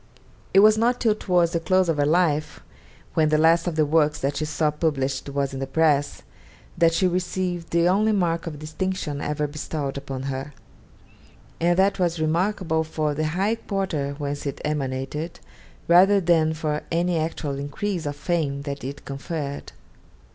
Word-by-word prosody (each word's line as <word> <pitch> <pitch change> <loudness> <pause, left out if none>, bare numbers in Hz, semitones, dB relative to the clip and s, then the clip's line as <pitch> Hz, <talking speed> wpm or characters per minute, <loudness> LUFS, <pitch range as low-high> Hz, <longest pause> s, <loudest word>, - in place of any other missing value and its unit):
It 195 - +6
was 215 +1 +6
not 245 +2 +2
till 225 -3 +3
towards 180 -5 +1
the 170 - 0
close 185 +2 +2
of 165 -2 0
her 145 0 +2
life, 155 -2 +1 0.5
when 155 -1 +3
the 155 - +3
last 165 +2 +4
of 170 - -1
the 155 -1 +3
works 150 0 +2
that 140 +1 -1
she 155 - -1
saw 150 0 0
published 140 -3 -1
was 140 -1 -2
in 135 - -4
the 135 - -3
press, 145 -1 +1 0.5
that 165 -1 +4
she 165 +3 +1
received 180 -1 -2
the 170 0 +3
only 210 +4 +3
mark 170 -5 0
of 155 -3 -5
distinction 155 -1 -3
ever 150 0 -1
bestowed 145 -1 -4
upon 135 -1 -5
her; 135 +2 -4 1.1
and 175 +1 +2
that 195 +1 +3
was 170 -2 0
remarkable 165 0 0
for 155 -1 -2
the 155 +2 -1
high 200 +4 +2
quarter 185 -11 -3
whence 145 0 -4
it 140 - -4
emanated 150 +2 -3 0.5
rather 190 +4 +6
than 160 -3 +2
for 150 -1 -2
any 170 0 +1
actual 155 -3 -3
increase 165 +4 -3
of 145 - -3
fame 145 -2 -1
that 140 -1 -5
it 135 +2 -7
conferred. 140 0 -5
160 Hz, 170 wpm, -24 LUFS, 145-175 Hz, 1.1 s, It